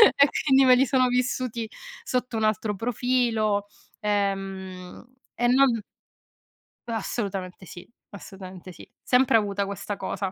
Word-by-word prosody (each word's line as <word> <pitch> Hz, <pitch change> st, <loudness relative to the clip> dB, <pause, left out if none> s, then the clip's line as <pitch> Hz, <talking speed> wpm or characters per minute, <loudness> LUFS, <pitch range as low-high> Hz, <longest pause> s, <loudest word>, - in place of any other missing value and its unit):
e 280 Hz, -, +6 dB, 0.2 s
quindi 270 Hz, -2 st, +5 dB
me 255 Hz, -, +7 dB
li 260 Hz, +2 st, +4 dB
sono 255 Hz, -1 st, +3 dB
vissuti 250 Hz, -2 st, -1 dB, 0.3 s
sotto 250 Hz, -1 st, -2 dB
un 220 Hz, -, -1 dB
altro 215 Hz, 0 st, 0 dB
profilo. 225 Hz, -2 st, 0 dB, 0.3 s
Ehm, 195 Hz, -2 st, -3 dB, 0.3 s
e 240 Hz, -, +1 dB
non 250 Hz, -3 st, +4 dB, 1.1 s
Assolutamente 195 Hz, -5 st, -4 dB
sì, 175 Hz, 0 st, -11 dB, 0.2 s
assolutamente 190 Hz, -2 st, -10 dB
sì. -, -, -14 dB
Sempre 250 Hz, -2 st, +4 dB
avuta 200 Hz, -1 st, -1 dB
questa 200 Hz, +1 st, -5 dB
cosa. 195 Hz, -1 st, -3 dB
215 Hz, 120 wpm, -25 LUFS, 195-250 Hz, 1.1 s, me